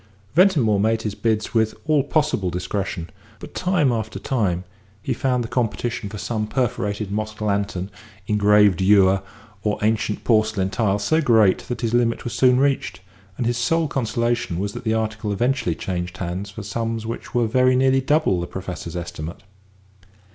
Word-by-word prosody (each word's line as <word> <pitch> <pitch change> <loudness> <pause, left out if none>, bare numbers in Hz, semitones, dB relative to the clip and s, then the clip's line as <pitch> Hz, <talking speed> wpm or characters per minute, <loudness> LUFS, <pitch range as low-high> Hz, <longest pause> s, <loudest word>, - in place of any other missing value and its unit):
Ventimore 145 - +4
made 110 +2 +1
his 105 - -2
bids 110 -1 -1
with 110 -1 +2
all 155 -2 +3
possible 145 - 0
discretion, 90 -1 -3 0.3
but - - -11
time 180 -7 +2
after 110 -2 -3
time 95 -9 -1 0.4
he - - -2
found 125 -2 0
the - - -5
competition 120 -2 -2
for 105 - -7
some 110 0 -2
perforated 105 -5 -2
mosque 110 +1 -3
lantern, 100 -2 -1 0.3
engraved 105 -2 +4
ewer, 95 -1 +5 0.4
or 105 - 0
ancient 110 -1 0
porcelain 110 -4 +2
tile 105 -4 +1
so 160 +10 +1
great 110 -8 +4
that 125 - -4
his 115 -1 -1
limit 120 -1 +1
was 120 - -4
soon 125 -1 +4
reached, 140 -7 0 0.4
and 125 - -1
his 120 +1 0
sole 165 +6 +1
consolation 120 - -1
was 100 +2 -2
that - - -8
the 110 - +1
article 110 -1 -2
eventually 120 -4 0
changed 90 +1 -4
hands 95 +2 -4
for 105 +2 -8
sums 115 +2 -3
which 115 +2 -6
were 120 -1 +3
very 130 +3 +3
nearly 135 +1 +3
double 140 - +2
the 85 - -4
Professor's 90 -3 -6
estimate. 85 -1 -6
110 Hz, 165 wpm, -22 LUFS, 100-120 Hz, 0.4 s, ewer